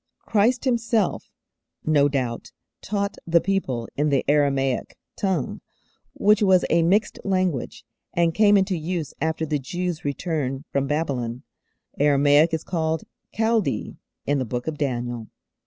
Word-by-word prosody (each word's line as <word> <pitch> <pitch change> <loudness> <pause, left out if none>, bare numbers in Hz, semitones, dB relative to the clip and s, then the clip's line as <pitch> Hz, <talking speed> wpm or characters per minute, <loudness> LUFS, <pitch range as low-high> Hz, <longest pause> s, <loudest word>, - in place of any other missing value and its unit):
Christ 235 +5 +2
Himself 230 -4 0 0.6
no 145 -2 +4
doubt 125 -4 -3 0.3
taught 200 -1 -2
the 170 0 +5
people 150 -12 -1
in 150 +1 +1
the 140 -2 +1
Aramaic 135 -3 +1 0.2
tongue, 185 -9 -2 0.5
which 210 +1 +3
was 190 -3 +4
a 170 - +4
mixed 195 +6 +2
language, 185 -8 -1 0.3
and 170 -1 +2
came 205 0 +5
into 190 -1 +1
use 160 -2 -3
after 160 +1 0
the 150 -1 -1
Jews' 175 +4 -4
return 145 -2 -2
from 140 0 0
Babylon. 130 -5 -2 0.6
Aramaic 145 +2 +4
is 160 -1 -2
called 160 -2 -1 0.3
'Chaldee' 225 -1 0 0.3
in 145 0 +1
the - - 0
Book 125 0 -4
of 155 -2 -4
Daniel. 120 -4 -2
160 Hz, 135 wpm, -24 LUFS, 140-190 Hz, 0.6 s, the